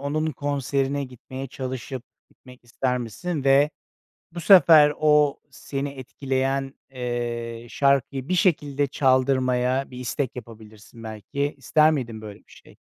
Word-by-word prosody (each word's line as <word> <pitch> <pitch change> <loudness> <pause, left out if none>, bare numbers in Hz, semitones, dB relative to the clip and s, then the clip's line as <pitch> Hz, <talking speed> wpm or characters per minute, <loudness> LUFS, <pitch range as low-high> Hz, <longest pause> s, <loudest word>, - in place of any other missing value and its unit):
onun 150 +3 -1
konserine 140 -1 -1
gitmeye 130 +1 -8
çalışıp, 130 -1 -6 0.3
gitmek 125 -2 -18
ister 125 +1 -1
misin 140 - -4
ve 140 +2 +4 0.6
bu 175 - -6
sefer 160 -5 +7
o 150 -2 +3
seni 140 +1 -5
etkileyen, 135 0 -3 0.2
eee, 120 -2 -4
şarkıyı 140 -1 +1
bir 185 - +1
şekilde 145 -6 +1
çaldırmaya 130 -1 +1
bir 125 - -9
istek 125 +1 -3
yapabilirsin, 110 -1 -12
belki. 110 +7 -4
İster 155 +4 +3
miydin 120 -7 -3
böyle 105 -2 -9
bir - - -24
şey? - - -18
135 Hz, 125 wpm, -24 LUFS, 125-145 Hz, 0.6 s, sefer